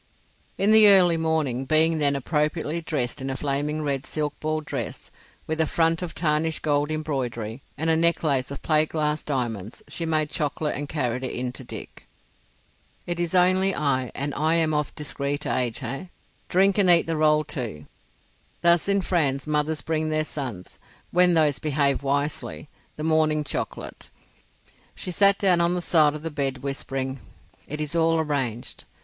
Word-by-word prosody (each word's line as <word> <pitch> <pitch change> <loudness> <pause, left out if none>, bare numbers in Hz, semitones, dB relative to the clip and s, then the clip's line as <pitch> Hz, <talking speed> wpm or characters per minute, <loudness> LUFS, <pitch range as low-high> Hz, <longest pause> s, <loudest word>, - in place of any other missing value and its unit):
In 200 +2 +2
the 220 -1 +8
early 185 -4 +6
morning, 160 -6 0
being 160 +2 +3
then 140 -1 +2
appropriately 150 +3 -1
dressed 135 -7 -3
in 135 - -3
a 135 - -2
flaming 145 +2 -1
red 140 -2 -1
silk 150 -2 -3
ball 155 0 -1
dress, 140 -6 -6 0.3
with 160 +1 -1
a 160 - +2
front 165 +1 +1
of 175 -2 -5
tarnished 155 0 0
gold 145 -1 +1
embroidery 130 -7 -3 0.2
and 160 - -2
a 160 - +4
necklace 160 -5 +1
of 140 - -8
plate 155 -1 +2
glass 150 -1 -1
diamonds, 120 -7 -4
she 165 - -3
made 155 -2 0
chocolate 150 -1 -2
and 145 0 -4
carried 130 -4 -2
it 130 - -3
in 125 0 -2
to 130 - -9
Dick. - - -10 1.0
"It 175 0 -3
is 175 +1 -1
only 185 +2 +3
I, 130 -5 0
and 140 +1 -2
I 155 +2 +2
am 160 -2 +2
of 150 -1 -1
discreet 145 0 -3
age, 125 -3 -1
eh? 135 +9 -4 0.4
Drink 195 +2 +3
and 190 -3 +4
eat 170 -1 +7
the 165 - -2
roll 155 0 +3
too. 110 - -6 0.8
Thus 170 +2 +4
in 200 0 +2
France 145 -7 0
mothers 150 0 0
bring 155 -1 -1
their 155 0 +1
sons, 125 -13 -6 0.3
when 180 0 +4
those 150 -3 +2
behave 140 -2 +1
wisely, 140 +1 -2 0.3
the 150 - -6
morning 155 -1 +2
chocolate." 145 - -5 0.9
She 180 - -5
sat 200 +3 +4
down 180 -4 +3
on 170 +1 +2
the - - -1
side 155 -4 +3
of 155 - -8
the 165 - -3
bed 135 -3 -2
whispering:—"It 135 +1 -6
is 150 +2 -3
all 165 0 +3
arranged. 135 -7 -3
150 Hz, 170 wpm, -25 LUFS, 140-165 Hz, 1.0 s, the